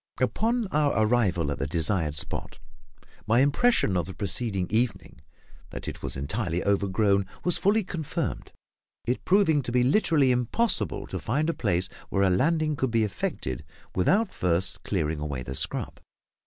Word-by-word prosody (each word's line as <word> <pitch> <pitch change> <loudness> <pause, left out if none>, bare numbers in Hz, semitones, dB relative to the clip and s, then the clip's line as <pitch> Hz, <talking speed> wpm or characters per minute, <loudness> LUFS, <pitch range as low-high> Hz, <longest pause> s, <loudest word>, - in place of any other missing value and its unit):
Upon 225 - +1
our 145 -7 +2
arrival 95 -10 +1
at - - -4
the 70 - -1
desired 80 0 +1
spot, 75 - -5 0.7
my 115 +3 +4
impression 145 - +3
of 90 -1 0
the 95 - -8
preceding 100 -1 +1
evening 110 - -1 0.5
that - - -8
it - - -6
was - - -3
entirely 85 - -2
overgrown 100 0 +2 0.2
was 175 - +3
fully 210 +3 +3
confirmed, 165 -5 -4 0.5
it 125 - -1
proving 185 -6 +4
to 125 - -5
be 125 0 +3
literally 145 -2 +3
impossible 125 - 0
to - - -5
find 150 +8 0
a - - -7
place 95 - 0 0.2
where 100 - +1
a 95 - +3
landing 155 - +1
could 130 -2 -1
be 115 -1 +2
effected 65 - -3 0.3
without 195 - +2
first 90 +1 0
clearing 80 -5 -2
away 70 -4 -4
the 65 - -6
scrub. - - -3
110 Hz, 155 wpm, -26 LUFS, 90-150 Hz, 0.7 s, my